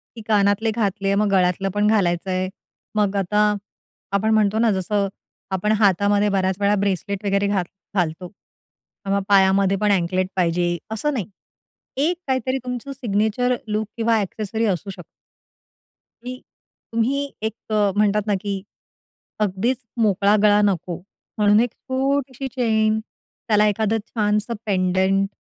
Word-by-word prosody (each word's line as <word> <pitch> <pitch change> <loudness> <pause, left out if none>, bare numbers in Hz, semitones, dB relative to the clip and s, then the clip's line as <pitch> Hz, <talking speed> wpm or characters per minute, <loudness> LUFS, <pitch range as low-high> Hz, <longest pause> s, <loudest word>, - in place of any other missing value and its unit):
की 225 - -8
कानातले 210 +1 +2
घातले, 200 -3 0
मग 210 +1 +2
गळ्यातलं 185 +1 +2
पण 210 0 +2
घालायच 190 -4 +1
आहे. 185 0 -1 0.5
मग 205 -1 +1
आता 210 +3 +2 0.7
आपण 215 +2 +2
म्हणतो 215 0 +2
ना, 230 -2 +4
जसं 195 +1 0 0.4
आपण 190 +3 0
हातामध्ये 205 +1 +3
बऱ्याच 190 -1 +1
वेळा 200 +1 +3
ब्रेसलेट 200 +1 -2
वगैरे 200 0 +1
घाल 195 -3 +1 0.3
घालतो 175 0 -1
किंवा 200 +1 -8
मग - - -5
पायामध्येपण 195 +1 +4
अँकलेट 185 0 +1
पाहिजे 175 -1 +1
असं 285 +7 -1
नाही. 220 -8 -2 0.7
एक 335 +5 +1
काहीतरी 260 0 0
तुमचं 250 +2 -5
सिग्नेचर 240 0 0
लूक 215 0 -1
किंवा 225 -1 +2
एक्सेसरी 215 +3 -3
असू 195 0 -1
शकतं. 190 - -8 1.2
मी, 255 +1 -6 0.5
तुम्ही 255 +5 +1 0.2
एक 220 - -1 0.2
अ, 205 -2 +3
म्हणतात 210 0 +2
ना, 205 - +2
की 200 -2 -3 0.8
अगदीच 210 +5 0 0.2
मोकळा 205 0 +3
गळा 210 0 +5
नको 180 -3 -1 0.4
म्हणून 210 0 +5
एक, 240 -1 +1
छोटीशी 270 0 -2
चैन, 220 -3 +2 0.5
त्याला 210 -1 +4
एखादं 220 +1 +1
छानसं 210 +1 0
पेंडेंट. 190 0 +2
205 Hz, 135 wpm, -22 LUFS, 195-220 Hz, 1.2 s, गळा